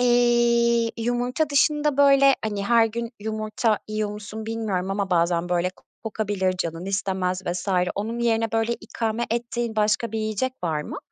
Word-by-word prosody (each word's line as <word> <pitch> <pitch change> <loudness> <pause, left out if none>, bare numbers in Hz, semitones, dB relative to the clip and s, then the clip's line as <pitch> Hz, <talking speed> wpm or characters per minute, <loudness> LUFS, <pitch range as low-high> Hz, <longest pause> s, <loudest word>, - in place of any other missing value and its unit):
Eee, 240 -1 +3
yumurta 245 +6 -1
dışında 295 0 +2
böyle, 275 -1 +6
hani, 205 -2 -2
her 230 0 +4
gün 235 +1 -4
yumurta 215 +1 -1
yiyor 215 -1 -2
musun 210 +1 -7
bilmiyorum 210 -5 -2
ama 195 -1 -2
bazen 170 0 +1
böyle 180 0 +1 0.3
kokabilir, 205 -4 -1
canın 165 0 -3
istemez 190 -2 -1
vs. 175 +3 -3 0.3
Onun 220 +4 -3
yerine 225 -1 +1
böyle 225 +1 +1
ikame 230 +1 -3
ettiğin 235 -1 -2
başka 215 +1 +1
bir 220 - -1
yiyecek 215 +4 -1
var 155 -3 -1
mı? - - -6
220 Hz, 150 wpm, -24 LUFS, 200-235 Hz, 0.3 s, böyle